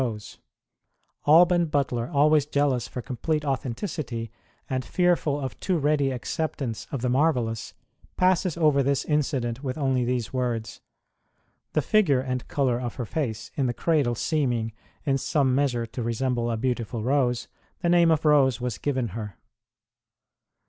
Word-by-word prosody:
ROSE 110 -5 -4
OF - - -24 0.9
LIMA 155 +2 +8
Alban 175 0 +5
Butler, 135 -5 0
always 150 0 +4
jealous 140 -5 +1
for 125 - -6
complete 150 +4 -2
authen 135 -4 -2
ticity, 120 - -4 0.4
and 130 -1 -2
fearful 175 -5 +1
of 130 -3 -5
too 185 -3 0
ready 145 -2 +2
acceptance 130 -2 -3
of 135 -4 -4
the - - +1
marvellous, 125 -5 0 0.4
passes 185 -2 +2
over 150 -4 +4
this 140 0 0
incident 135 -4 -1
with 130 +1 -3
only 135 -4 +1
these 120 -1 -2
words: 115 -3 -2 0.9
The 155 - +1
figure 175 -11 +3
and 130 -1 -3
colour 125 -4 0
of 120 -2 -4
her 125 - -4
face 115 -4 -3
in 135 -3 +1
the 120 - -2
cradle 145 -8 +1
seeming, 120 -6 0 0.3
in 135 -2 +1
some 135 -2 +1
measure, 125 -4 +1
to 115 +2 -6
resemble 120 +1 -1
a 115 - -1
beautiful 120 -2 -2
rose, 125 -2 +1 0.4
the 170 - +2
name 170 -1 +5
of 160 -1 +2
Rose 140 -4 +4
was 125 -4 -3
given 130 -5 -1
her. 105 -2 -7
130 Hz, 155 wpm, -26 LUFS, 120-150 Hz, 0.9 s, LIMA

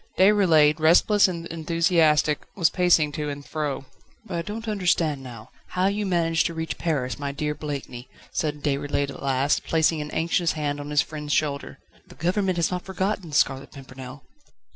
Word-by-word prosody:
Déroulède, 170 -7 +5
restless 180 +6 +5
and 170 -2 -5
enthusiastic, 165 -2 +2 0.2
was 170 -5 +3
pacing 170 -4 +3
to 150 0 -3
and 145 0 -7
fro. 145 -4 -3 0.4
"But 195 - -4
I - - -1
don't 215 +6 -6
understand 175 -8 +1
now, 120 -4 -11 0.2
how 185 +1 -1
you 200 +1 0
managed 165 -3 +1
to 170 - -7
reach 160 0 -4
Paris, 145 -7 -1
my 140 -1 -3
dear 150 +1 -2
Blakeney!" 140 -5 -6 0.2
said 150 -2 -2
Déroulède 145 0 -1
at - - -10
last, 135 +1 +1
placing 160 -1 +1
an 150 - -6
anxious 165 +1 0
hand 145 -2 -2
on 145 0 -6
his 150 0 +3
friend's 150 -2 -5
shoulder. 140 -2 -1 0.3
"The - - -15
government 185 +1 0
has 170 0 +1
not 180 0 -2
forgotten 190 -1 -2
The 145 - -6
Scarlet 135 -1 +1
Pimpernel." 130 0 -10
155 Hz, 175 wpm, -24 LUFS, 145-175 Hz, 0.4 s, Déroulède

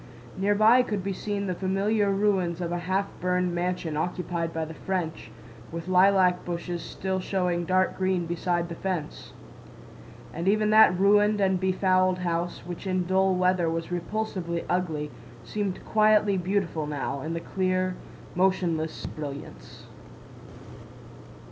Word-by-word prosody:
Near 200 +2 +1
by 220 +4 +6
could 210 -6 -3
be 195 0 -2
seen 200 +1 -3
the 185 - -1
familiar 200 +3 0
ruins 195 -4 +1
of 175 -1 -3
a 175 - -1
half 190 +3 0
burned 180 -1 0
mansion 175 -2 -2
occupied 170 0 -2
by 160 -1 -2
the 160 - -8
French, 165 -7 -4 0.4
with 170 +1 -6
lilac 185 -1 +4
bushes 175 0 -4
still 190 0 -3
showing 180 -2 -1
dark 185 +2 +1
green 185 -2 +1
beside 170 0 -1
the - - -4
fence. 175 -3 -5 1.0
And 170 +3 -4
even 215 +1 +3
that 215 -4 +6
ruined 205 +1 +4
and 190 -2 +2
befouled 185 0 +2
house—which 175 +1 -3
in 185 -1 0
dull 190 +1 +2
weather 180 -2 +2
was 165 +1 -3
repulsively 175 -2 -3
ugly—seemed 160 - -4
quietly 215 -2 +4
beautiful 180 -4 -1
now, 140 -1 -3
in 160 +3 -4
the - - -2
clear, 185 +1 -1 0.4
motionless 175 -4 0
brilliance. 140 - -8
180 Hz, 135 wpm, -26 LUFS, 170-195 Hz, 1.0 s, by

